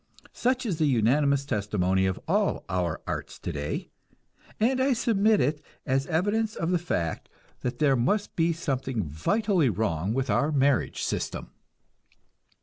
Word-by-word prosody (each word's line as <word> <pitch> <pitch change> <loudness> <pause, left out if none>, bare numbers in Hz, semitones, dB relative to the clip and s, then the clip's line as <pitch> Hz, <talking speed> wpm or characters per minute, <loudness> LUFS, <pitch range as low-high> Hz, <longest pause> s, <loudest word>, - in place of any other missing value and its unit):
Such 255 +1 0
is 180 -8 -2
the 155 - +3
unanimous 140 +3 +2
testimony 95 -5 +1
of 95 - -2
all - - +1
our 90 -3 -1
arts - - -4
today, 75 -4 -4 0.7
and 255 +4 +2
I 265 0 +3
submit 220 -3 +3
it 145 +4 0 0.2
as 135 0 0
evidence 205 +7 0
of 165 +1 -1
the 180 - +2
fact 85 - -2 0.3
that 125 0 -3
there 140 -1 +3
must 200 - 0
be 165 0 +2
something 135 -7 -2
vitally 170 - +1
wrong 100 -1 -1
with 135 0 0
our 150 +2 +2
marriage 140 -2 +1
system. - - -3
140 Hz, 145 wpm, -27 LUFS, -, 0.7 s, the